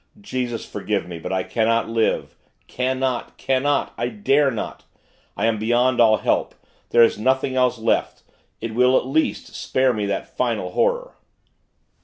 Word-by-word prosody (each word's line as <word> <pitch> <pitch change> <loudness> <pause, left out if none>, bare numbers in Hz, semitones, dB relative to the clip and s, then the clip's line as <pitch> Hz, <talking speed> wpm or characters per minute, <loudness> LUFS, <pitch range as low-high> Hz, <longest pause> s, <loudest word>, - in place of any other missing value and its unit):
Jesus, 125 - -4
forgive 100 -3 -3
me, 85 -2 -7
but - - -6
I 95 -1 0
cannot 115 +2 +1
live, 115 0 0 0.3
cannot, 130 -1 -2
cannot! 135 +2 0
I 120 - 0
dare 145 -8 +2
not! 115 -5 -5 0.5
I - - 0
am 115 -2 +1
beyond 120 +3 +2
all 110 -2 +5
help - - 0 0.3
there 120 - +6
is 115 - +2
nothing 130 +3 +1
else 125 -1 +2
left. 110 0 -1 0.4
It 115 0 -4
will, 125 +2 +4
at - - 0
least, 155 +4 -1
spare 130 -1 +1
me 105 -2 -2
that 100 -1 -4
final - - -1
horror.... - - 0
120 Hz, 155 wpm, -22 LUFS, 110-130 Hz, 0.5 s, there